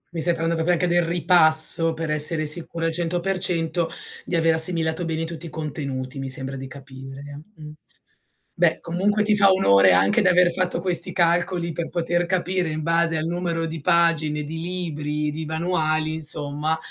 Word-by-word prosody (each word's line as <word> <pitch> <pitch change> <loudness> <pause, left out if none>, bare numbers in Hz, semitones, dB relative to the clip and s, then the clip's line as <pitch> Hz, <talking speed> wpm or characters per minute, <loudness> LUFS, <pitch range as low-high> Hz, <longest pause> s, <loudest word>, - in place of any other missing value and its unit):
Mi 165 - -2
stai 175 +1 0
parlando 165 0 -1
proprio 165 +2 +1
anche 175 +1 0
del 175 0 +2
ripasso 165 -1 +3
per 160 -1 -4
essere 150 -1 +1 0.2
essere - - -3
sicura 165 +1 -1
al 165 - 0
100% 175 -1 -1 0.3
di 175 - -4
aver 165 0 +3
assimilato 160 0 +2
bene 165 0 -3
tutti 165 0 -7
i - - -9
contenuti, 140 -4 -5
mi 135 0 -5
sembra 135 +1 -3
di 135 0 -7
capire, 135 +2 -11
mh. 150 -1 -11 0.8
Beh, - - +2
comunque 200 +5 0
ti 210 0 +2
fa 200 -1 +4
onore 100 - +4
anche 95 - +3
di 190 - +2
aver 180 -1 +4
fatto 180 -1 -1
questi 175 -2 +1
calcoli 170 0 0
per 165 +1 -5
poter 175 0 -1
capire 185 -1 -1
in 155 0 -4
base 165 0 +1
al 155 - -2
numero 170 -1 -2
di 160 -2 -6
pagine, 155 -2 +1
di 160 +2 -6
libri, 150 -4 -3
di 160 +2 -6
manuali, 155 -1 -1
insomma, 155 0 -1
165 Hz, 175 wpm, -22 LUFS, 150-175 Hz, 0.8 s, fa